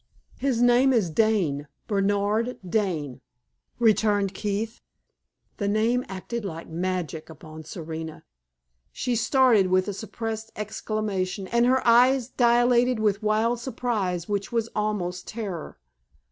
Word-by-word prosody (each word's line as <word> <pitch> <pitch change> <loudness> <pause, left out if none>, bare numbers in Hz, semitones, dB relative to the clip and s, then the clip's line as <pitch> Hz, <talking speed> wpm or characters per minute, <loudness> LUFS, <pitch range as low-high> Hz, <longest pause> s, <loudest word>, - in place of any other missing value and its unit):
"His 255 -4 +1
name 245 +2 +5
is 205 -9 +1
Dane 170 -8 +1 0.2
Bernard 205 +4 0
Dane," 170 - -1 0.6
returned 210 -3 +2
Keith. 210 +3 -3 0.8
The 200 - -1
name 225 +4 +2
acted 205 +5 -5
like 165 -4 -6
magic 170 -2 -3
upon 155 0 -11
Serena. 160 -1 -7 0.7
She 250 -1 -2
started 235 -3 +4
with 185 +1 +2
a 205 - -2
suppressed 220 +1 -5
exclamation, 210 -3 -3
and 235 +1 +3
her 260 +1 +2
eyes 250 +1 +5
dilated 245 0 +3
with 210 -1 +1
wild 220 +3 +1
surprise 220 -8 -2
which 200 -1 -2
was 230 -1 0
almost 190 -4 -2
terror. 200 - -6
215 Hz, 120 wpm, -25 LUFS, 185-235 Hz, 0.8 s, name